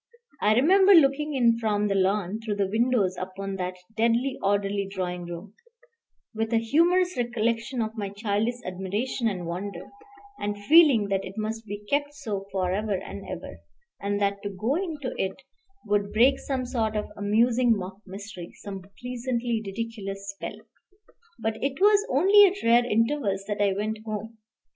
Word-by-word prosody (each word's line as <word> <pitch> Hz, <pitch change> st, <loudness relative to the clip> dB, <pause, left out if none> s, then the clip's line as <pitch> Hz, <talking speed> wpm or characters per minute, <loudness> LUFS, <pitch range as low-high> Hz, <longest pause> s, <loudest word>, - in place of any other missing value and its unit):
I 215 Hz, +1 st, +4 dB
remember 380 Hz, -, +6 dB
looking 300 Hz, -1 st, +4 dB
in 235 Hz, -3 st, +3 dB
from 210 Hz, -2 st, +1 dB
the 200 Hz, -, 0 dB
lawn 195 Hz, +1 st, +1 dB
through 215 Hz, -2 st, -2 dB
the 200 Hz, -1 st, +1 dB
windows 220 Hz, -4 st, +2 dB
upon 195 Hz, +1 st, -5 dB
that 180 Hz, 0 st, -3 dB, 0.2 s
deadly 235 Hz, +4 st, +2 dB
orderly 200 Hz, 0 st, 0 dB
drawing 180 Hz, -2 st, -4 dB
room, 175 Hz, +4 st, -8 dB, 0.8 s
with 225 Hz, +1 st, -2 dB
a -, -, +5 dB
humorous 345 Hz, +10 st, +3 dB
recollection 235 Hz, +1 st, -1 dB
of 220 Hz, +1 st, -5 dB
my 205 Hz, -3 st, -3 dB
childish 210 Hz, +3 st, -1 dB
admiration 195 Hz, +7 st, -2 dB
and 185 Hz, -5 st, -3 dB
wonder, 180 Hz, +1 st, -6 dB, 0.5 s
and 205 Hz, 0 st, -2 dB
feeling 250 Hz, -2 st, +5 dB
that 195 Hz, -1 st, 0 dB
it 185 Hz, -, -8 dB
must 220 Hz, +1 st, -4 dB
be 205 Hz, +1 st, -7 dB
kept 290 Hz, +2 st, 0 dB
so 210 Hz, -9 st, -5 dB
forever 195 Hz, +2 st, 0 dB
and -, -, -9 dB
ever, -, -, -7 dB, 0.4 s
and 205 Hz, 0 st, -1 dB
that 200 Hz, 0 st, 0 dB
to 205 Hz, -, -4 dB
go 215 Hz, +7 st, -1 dB
into 305 Hz, -7 st, -3 dB
it 190 Hz, 0 st, -2 dB, 0.5 s
would 205 Hz, 0 st, 0 dB
break 255 Hz, +5 st, +4 dB
some 260 Hz, -2 st, -3 dB
sort 225 Hz, -4 st, -1 dB
of 210 Hz, -, -3 dB
amusing 230 Hz, +3 st, +3 dB
mock 190 Hz, 0 st, -6 dB
mystery, 190 Hz, -2 st, -9 dB
some 195 Hz, -2 st, -7 dB, 0.2 s
pleasantly 245 Hz, -2 st, -2 dB
ridiculous 200 Hz, -2 st, -5 dB
spell. 195 Hz, -, -7 dB, 0.8 s
But 220 Hz, 0 st, -3 dB
it 275 Hz, 0 st, -1 dB
was 410 Hz, +1 st, +5 dB
only 395 Hz, +9 st, +7 dB
at 390 Hz, +2 st, -3 dB
rare 235 Hz, +1 st, +5 dB
intervals 225 Hz, -3 st, +1 dB
that 205 Hz, -1 st, -2 dB
I 200 Hz, -1 st, +3 dB
went 215 Hz, +2 st, -2 dB
home. 220 Hz, +1 st, -6 dB
215 Hz, 160 wpm, -26 LUFS, 200-245 Hz, 0.8 s, only